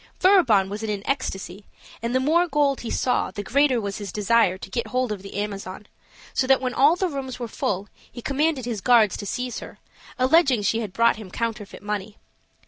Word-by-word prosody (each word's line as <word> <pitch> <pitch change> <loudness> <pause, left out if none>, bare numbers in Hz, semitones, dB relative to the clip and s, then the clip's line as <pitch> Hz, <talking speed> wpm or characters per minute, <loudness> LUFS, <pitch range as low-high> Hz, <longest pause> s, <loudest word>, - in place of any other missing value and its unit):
Furibon 310 - +5
was 205 +2 -5
in 220 - -3
an 205 -1 -3
ecstasy, 200 -8 -3 0.4
and 235 +2 -2
the - - +4
more 325 +6 +3
gold 290 -4 +1
he 235 - -5
saw 250 - 0
the 205 +2 -6
greater 270 +3 +2
was 200 -2 -4
his 200 -3 -6
desire 210 -2 +2
to - - -10
get 235 - -2
hold 255 -2 -1
of 205 -3 -4
the 195 - -10
Amazon; 200 -1 -5 0.5
so 260 - +1
that 270 0 +5
when 255 -1 -2
all 285 +6 +5
the 375 +1 0
rooms 270 -5 -5
were 240 - -4
full, 205 -2 -2 0.2
he - - -9
commanded 280 +1 0
his 230 -5 -3
guards 225 -5 +4
to 205 - -6
seize 250 +3 -3
her, - - -11 0.4
alleging 260 -3 +4
she 225 +3 +1
had 215 -4 -4
brought 230 +2 +3
him 215 -4 -9
counterfeit 215 -1 -5
money. 210 0 -4
230 Hz, 210 wpm, -24 LUFS, 205-265 Hz, 0.5 s, Furibon